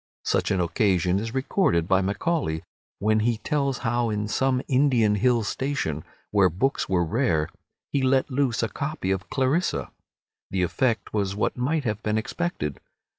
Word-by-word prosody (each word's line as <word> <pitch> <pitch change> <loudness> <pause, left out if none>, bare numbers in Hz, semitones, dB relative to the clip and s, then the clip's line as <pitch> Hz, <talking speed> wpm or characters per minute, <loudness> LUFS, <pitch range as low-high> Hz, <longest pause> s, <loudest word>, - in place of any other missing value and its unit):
Such - - +1
an 100 -2 +1
occasion 90 0 +2
is 115 +3 -5
recorded 130 - +1
by 95 0 +3
Macaulay, 100 - -1 0.3
when 110 +2 +2
he 115 +1 +1
tells 140 +2 -1
how 120 0 +1
in 105 0 -1
some 130 +3 +1
Indian 125 -6 +3
hill 120 +2 +2
station, 100 - -2 0.3
where 100 -3 +5
books 115 - -1
were 90 -2 +2
rare, 85 - +1 0.4
he 140 - +1
let 130 +1 +2
loose 125 -3 +1
a - - +2
copy 140 -3 -3
of 95 0 -2
"Clarissa." 140 +7 0 0.6
The 95 -1 0
effect 110 +4 0
was 100 -2 0
what 105 - 0
might 145 +5 0
have 110 -3 -2
been 105 -1 0
expected. 110 - -3
110 Hz, 160 wpm, -25 LUFS, 95-130 Hz, 0.6 s, where